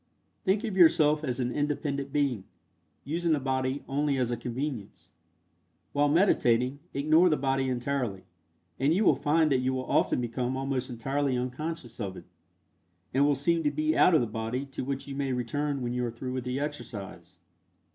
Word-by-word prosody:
Think 200 +4 +2
of 215 -5 -3
yourself 160 -4 +5
as 130 -3 -2
an 125 -1 0
independent 145 -1 -2
being, 135 -9 0 0.6
using 165 +2 0
the 150 - +1
body 130 +1 -1
only 140 0 0
as 125 -2 0
a - - 0
convenience. 120 -1 -5 0.8
While 145 0 +3
meditating, 135 - +3
ignore 155 +6 +4
the 155 - +2
body 135 -1 0
entirely, 125 -5 -2 0.6
and 140 +5 +3
you 205 +3 +2
will - - +6
find 155 +1 +2
that 130 - +3
you 130 +1 0
will 130 0 -3
often - - +2
become 125 +2 -2
almost 135 -1 -2
entirely 135 +3 -1
unconscious 130 0 -5
of 95 -4 -4
it, - - -11 0.9
and 140 +2 +4
will 145 - +3
seem 165 +5 +1
to 150 - +2
be 155 +2 0
out 180 - +5
of 155 - +5
the - - +1
body 115 +4 -3
to - - -4
which 135 +1 -3
you 140 - -5
may 135 -1 -1
return 140 +3 -2
when 120 0 -2
you 125 0 -1
are 120 - -1
through 125 +2 -6
with 130 -1 -3
the 125 +1 -2
exercise. 100 - -6
135 Hz, 185 wpm, -28 LUFS, 125-150 Hz, 0.9 s, will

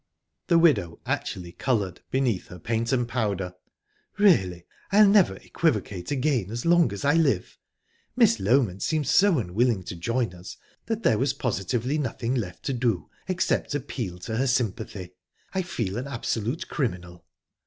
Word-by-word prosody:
The 170 - +4
widow 110 - +3
actually 90 -2 -3
coloured, 100 -5 -1
beneath 125 -8 0
her 90 - -10
paint 115 +6 -1
and 125 -3 +1
powder. 100 -7 -2 0.6
"Really, 95 - +3 0.3
I'll 210 +1 +7
never 195 - +5
equivocate 90 -1 -2
again 130 -7 0
as 115 +2 -5
long 170 - +4
as 100 +6 -5
I 145 - +4
live! 145 - +1 0.6
Miss 115 - +5
Loment 100 -2 +2
seemed 155 -2 0
so 190 +3 +4
unwilling 110 0 +1
to 90 - -6
join 115 +4 -1
us 90 +1 -10 0.3
that 225 0 -2
there 110 - +3
was 135 +2 +1
positively 120 - -1
nothing 125 -3 -2
left 100 -9 -4
to 135 - -1
do 115 -9 -1 0.2
except 185 -5 0
appeal 115 -9 -4
to 110 +4 -4
her 135 +2 +1
sympathy...I 100 - -3
feel 115 - -3
an 130 - -5
absolute 120 +1 -3
criminal." 90 - -3
115 Hz, 150 wpm, -26 LUFS, 95-140 Hz, 0.6 s, I'll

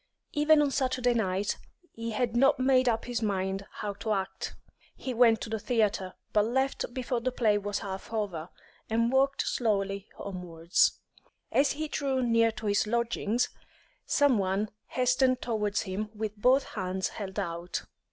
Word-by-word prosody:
Even 300 -1 +5
on 285 - +1
Saturday 255 -2 +1
night 200 -3 0 0.3
he 230 0 -5
had 235 +1 -1
not 270 +4 +5
made 255 -1 +4
up 225 -1 0
his 245 -1 -2
mind 195 -2 -1
how 205 -1 -5
to 210 +2 -2
act. 195 -1 -3 0.4
He 260 - -4
went 230 -2 +5
to - - -5
the 220 - -1
theatre, 205 -5 0 0.2
but 210 -1 +4
left 265 +2 0
before 245 -1 -2
the 255 +2 0
play 215 -4 +2
was 205 0 -2
half 190 +2 -6
over, 190 -7 -3 0.4
and 230 +2 +2
walked 275 +1 +3
slowly 200 -3 0
homewards. 175 -3 +1 0.6
As 280 +1 +3
he 310 +1 -3
drew 270 -3 0
near 230 -1 +4
to 220 - -8
his 205 0 +2
lodgings, 235 0 0 0.6
some 285 -6 +4
one 195 +2 0 0.2
hastened 255 0 +2
towards 210 -4 -1
him 210 +2 -3
with 215 0 -3
both 255 +6 +4
hands 185 -1 -2
held 195 -2 -7
out. 170 -2 -3
225 Hz, 160 wpm, -29 LUFS, 200-250 Hz, 0.6 s, Even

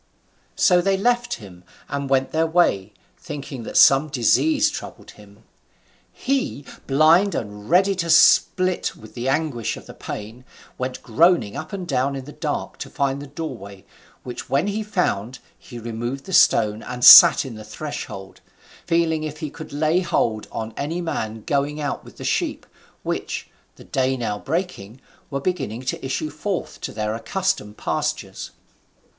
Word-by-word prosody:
So 180 -2 +4
they 195 +1 +1
left 240 +3 +1
him 90 -4 -13 0.2
and 140 -1 -4
went 135 -1 +1
their 160 +1 +1
way, 135 - +2 0.3
thinking 145 -5 -7
that - - -3
some 135 +3 +6
disease 215 - +2
troubled - - -9
him. - - -18 0.7
He, 270 - -2 0.2
blind 160 +8 +4
and 105 -2 -6
ready 190 +4 +4
to 170 -2 -2
split 185 +2 +4
with 110 - -14
the 125 +2 -3
anguish 135 -5 -1
of - - -12
the - - -11
pain, 110 +4 -8 0.4
went 130 0 -4
groaning 160 - +3
up 155 +2 -6
and 185 -3 -5
down 135 -1 0
in 135 -1 -6
the 150 - -10
dark, - - -4
to - - -6
find 140 0 -1
the 145 - -8
doorway, 120 - -8 0.4
which 125 -1 -7
when 140 +5 +1
he 205 +2 -2
found, 130 - -1 0.2
he 120 - -12
removed 120 +4 -5
the 190 - -7
stone, 105 -8 +4
and 125 0 -2
sat - - +10
in 130 - -7
the 110 -1 -9
threshold, 105 -5 -7 0.5
feeling 165 -2 +1
if 155 -1 -5
he 155 -2 -5
could 160 - -10
lay 155 +4 +1
hold 120 -12 -1
on 110 0 -5
any 160 +5 -3
man 110 -10 -4
going 145 +1 -1
out 145 -2 -3
with - - -15
the - - -8
sheep, - - -1 0.4
which - - -4 0.2
(the - - -14
day 130 0 0
now 105 -4 -3
breaking) 135 - -4 0.3
were 140 - -3
beginning 135 - -3
to 130 - -4
issue 140 +3 -3
forth 180 +5 -4
to - - -4
their 105 0 -2
accustomed 185 - -2
pastures. - - -3
140 Hz, 160 wpm, -22 LUFS, 115-170 Hz, 0.7 s, sat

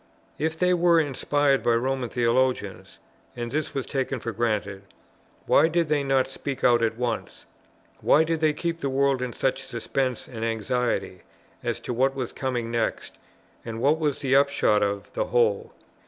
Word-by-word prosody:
If 160 +1 -1
they 180 +2 +3
were 170 -1 +4
inspired 145 -1 +1
by 120 - +2
Roman 130 +1 -1
theologians, 115 -6 0 0.4
(and 120 -1 -5
this 150 +2 -2
was 135 - -2
taken 135 -1 -2
for 115 - -4
granted,) 105 -4 -2 0.6
why - - +5
did 165 -1 0
they 150 -2 +2
not 135 -1 +2
speak 135 0 -6
out 120 -1 +5
at 115 0 0
once? 120 -2 -4 0.5
Why 155 - +4
did 165 0 -1
they 155 -1 +2
keep 165 +2 -3
the 140 - -2
world 135 -1 +1
in 125 -1 -2
such 135 +2 -1
suspense 130 +1 -3
and 115 -3 -7
anxiety 115 -4 -1 0.4
as - - -2
to - - -4
what 135 +3 +1
was 130 -3 -4
coming 125 -4 -3
next, 115 -1 -2 0.4
and 115 -1 -6
what 145 +6 +2
was 150 -3 0
to - - -13
be - - -2
the - - +7
upshot 140 -7 +3
of 100 0 -2
the - - -1
whole? 115 -4 +1
130 Hz, 180 wpm, -25 LUFS, 115-140 Hz, 0.6 s, the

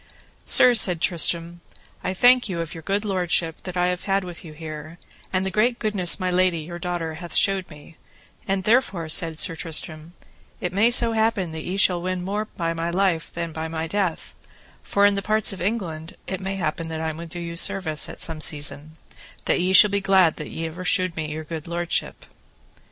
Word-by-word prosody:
Sir, 250 - +7
said 180 -7 +5
Tristram, 170 0 +1 0.4
I 185 - -2
thank 245 +2 +5
you 175 -3 -3
of 165 -2 -4
your 165 - -8
good 200 +6 -2
lordship 175 -4 -1
that 180 -1 -5
I 180 0 +2
have 180 0 -4
had 195 -1 +1
with 175 -2 -9
you 160 -3 -10
here, 155 +1 -8 0.3
and 185 0 0
the 190 - -2
great 235 +4 +2
goodness 205 -6 +1
my 185 -1 -1
lady, 180 -2 +2
your 175 +2 -8
daughter, 175 -2 -3
hath 170 -2 -8
shewed 195 -2 +1
me, 150 +1 -15 0.5
and 195 0 -1
therefore, 205 -7 +1
said 165 -1 +1
Sir 165 +1 +1
Tristram, 160 +1 -2 0.5
it 180 0 -4
may 210 +5 +4
so 235 -1 +5
happen 220 -6 0
that 160 0 -7
ye 185 +2 -3
shall 180 -3 +2
win 185 0 -3
more 205 +3 -2
by 165 -5 -3
my 165 +1 -3
life 175 -2 0
than 170 -1 -4
by 160 +1 -4
my 160 0 -4
death, 180 -1 -2 0.5
for 200 0 +2
in 205 - +5
the 200 - -2
parts 215 0 0
of 190 - -9
England 175 -6 -3
it 190 -1 -5
may 190 +1 -3
happen 165 -2 -3
I 160 0 -3
may 165 +2 -8
do 175 +2 -8
you 170 -1 -6
service 165 -3 +1
at - - -9
some 160 -2 -1
season, 150 +1 -3 0.5
that - - +1
ye 185 +1 +1
shall 195 +2 +7
be 200 0 0
glad 190 -4 +3
that 150 - -7
ever 165 +2 -5
ye - - -7
shewed 185 -1 +2
me 155 -1 -4
your 155 +1 -5
good 160 0 -7
lordship. 170 0 -2
175 Hz, 205 wpm, -23 LUFS, 160-195 Hz, 0.5 s, Sir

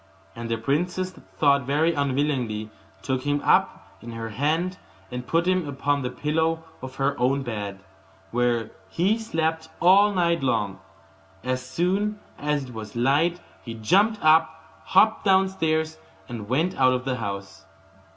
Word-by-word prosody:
And 115 0 -6
the 115 - 0
princess, 180 +10 -1 0.2
though 140 -2 +4
very 145 +5 +1
unwilling, 130 -7 -1 0.3
took 130 -1 -1
him 145 +1 0
up - - +1
in 115 0 -8
her 115 0 -5
hand, 160 - -1 0.3
and 125 0 -5
put 165 +1 +1
him 185 -3 +1
upon 140 +1 0
the 125 - -2
pillow 160 +4 -1 0.2
of 130 0 -8
her 135 - 0
own 135 +3 +1
bed, 100 -5 -5 0.5
where 120 -1 0 0.2
he 200 +7 +1
slept 160 -6 -2
all 195 +4 +6
night 170 -3 +1
long. 105 -7 0 0.6
As 130 0 -1
soon 195 +9 -1 0.2
as 150 -1 0
it 125 -2 -10
was 110 -1 -8
light 145 +8 +2 0.2
he 115 -2 -7
jumped 200 - +3
up, 160 0 +2
hopped 220 0 +4
downstairs, 160 -5 +1 0.3
and 110 -4 -7
went 160 +8 +1
out 130 -1 +5
of 125 0 -2
the 130 -1 -1
house. 100 -7 -6
145 Hz, 150 wpm, -25 LUFS, 125-170 Hz, 0.6 s, all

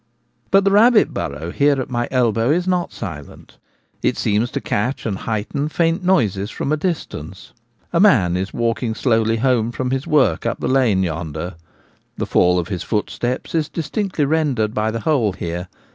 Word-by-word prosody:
But 195 0 +5
the 195 - +3
rabbit 220 +2 +5
burrow 75 +5 -4
here 145 +3 +2
at 130 - -4
my 120 -1 -1
elbow 115 -2 +1
is 175 +4 +2
not 180 -2 0
silent; 80 -10 -9 0.4
it - - 0
seems 105 +4 +1
to - - -3
catch 115 +7 -2
and 105 -4 -1
heighten 115 +9 -3
faint 165 +3 0
noises 105 - +1
from 140 - -3
a - - +3
distance. 145 - -5 0.4
A 170 - +3
man 110 - +4
is 95 +1 -2
walking 115 -1 -1
slowly 115 -2 +2
home 120 -2 +1
from 125 +1 -3
his 135 0 -2
work 130 - +2
up - - -2
the - - -2
lane 120 -8 +3
yonder; 80 +1 -4 0.6
the - - -1
fall 90 0 +3
of 90 +1 -2
his 95 -4 -3
footsteps 120 +3 -2
is 160 -2 0
distinctly 170 0 -2
rendered 140 -8 0
by 110 0 0
the 115 +1 -3
hole 120 -10 +1
here. 85 +1 -5
120 Hz, 175 wpm, -20 LUFS, 100-150 Hz, 0.6 s, But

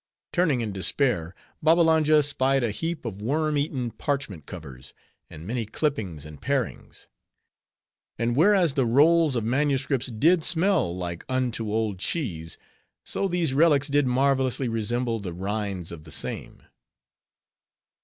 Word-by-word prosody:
Turning 165 -9 +2
in 110 -2 -3
despair, 95 - 0 0.3
Babbalanja 160 -2 +4
spied 135 -2 +1
a 115 - 0
heap 165 +6 -4
of 105 -3 -5
worm 150 +6 0
eaten 135 -4 -1
parchment 115 - -3
covers, 70 -7 -10 0.3
and 80 - -10
many 115 +3 -2
clippings 105 - -3
and 75 -2 -11
parings. 135 -4 -3 1.1
And 120 +1 0
whereas 175 0 +4
the 135 -4 +1
rolls 155 +4 +4
of 115 - 0
manuscripts 135 +1 0
did 155 +9 +2
smell 165 - +2
like 85 -2 -5
unto 125 -4 -1
old 110 -3 -1
cheese; 90 - -3 0.5
so 195 - -1
these 175 -6 0
relics 145 -1 +4
did 145 -1 +2
marvelously 130 0 +1
resemble 115 +1 -1
the 95 -4 -6
rinds 95 -1 -3
of 80 -2 -9
the 80 - -12
same. - - -5
125 Hz, 135 wpm, -25 LUFS, 105-150 Hz, 1.1 s, Babbalanja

